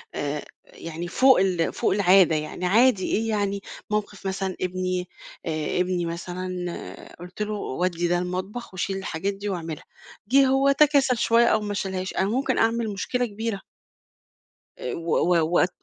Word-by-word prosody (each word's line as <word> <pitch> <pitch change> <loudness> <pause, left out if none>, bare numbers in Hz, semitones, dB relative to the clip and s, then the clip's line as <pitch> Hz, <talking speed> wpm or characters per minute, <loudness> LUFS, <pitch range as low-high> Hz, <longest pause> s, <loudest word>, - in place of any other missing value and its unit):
آآ 145 +1 -3 0.2
يعني 165 +1 -7
فوق 260 +7 +5
ال 180 -3 +1
فوق - - +1
العادة 185 -4 +5
يعني 155 +4 -3
عادي 215 0 +4
إيه 225 +1 0
يعني 200 -2 -1 0.3
مَوقِف 210 -1 -3
مثلًا 190 -1 -2
ابني 185 0 -2 0.4
آآ 155 +1 -2
ابني 180 -1 0
مثلًا 180 +1 -6
قُلت 180 +4 -9
له 210 0 -1
ودّي 175 -1 -1
ده 175 0 +2
المطبخ 185 +5 -4
وشيل 190 +1 -2
الحاجات 190 +1 -3
دي 200 +1 -5
وأعملها، 165 -4 -5 0.4
جِه 270 +3 +5
هو 270 +1 +4
تكاسل 275 -4 +4
شوية 235 0 +4
أو 215 -2 +3
ما 205 -1 -3
شالهاش، 190 -1 -3
أنا 190 +2 0
ممكن 260 +4 0
أعمل 225 0 +1
مشكلة 245 +5 -1
كبيرة. 215 -2 -4 1.2
آآ 125 - -4
و 170 0 -6 0.3
و 160 -1 +3
وات 175 +1 +3
190 Hz, 155 wpm, -25 LUFS, 175-215 Hz, 1.2 s, فوق